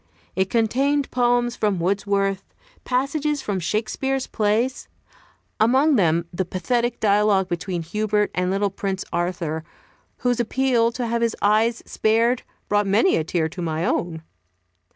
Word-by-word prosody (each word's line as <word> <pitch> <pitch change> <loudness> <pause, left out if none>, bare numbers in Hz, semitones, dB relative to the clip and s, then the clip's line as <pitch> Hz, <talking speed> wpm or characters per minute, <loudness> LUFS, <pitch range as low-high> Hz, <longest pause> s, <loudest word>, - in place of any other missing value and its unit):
It 190 +1 +1
contained 270 +5 +1
poems 245 -1 +1
from 210 -3 0
Wordsworth, 195 +2 0 0.4
passages 285 +3 0
from 200 -2 -2
Shakespeare's 230 +8 -1
plays, 225 +5 0 0.7
among 265 +7 +4
them 170 -5 +2
the 190 - -1
pathetic 235 +7 -1
dialogue 205 -2 +3
between 175 0 -3
Hubert 210 +4 0
and 180 0 0
little 195 +1 0
Prince 195 -1 -3
Arthur, 170 -3 -2 0.5
whose 245 -1 0
appeal 240 -1 +2
to 245 0 -3
have 235 0 -1
his 230 -1 +1
eyes 220 +3 +2
spared, 230 +3 +1 0.3
brought 205 -1 +1
many 215 - +3
a 160 - +1
tear 160 0 0
to 175 +3 -7
my 160 0 -2
own. 165 -2 -2
210 Hz, 135 wpm, -23 LUFS, 185-240 Hz, 0.7 s, among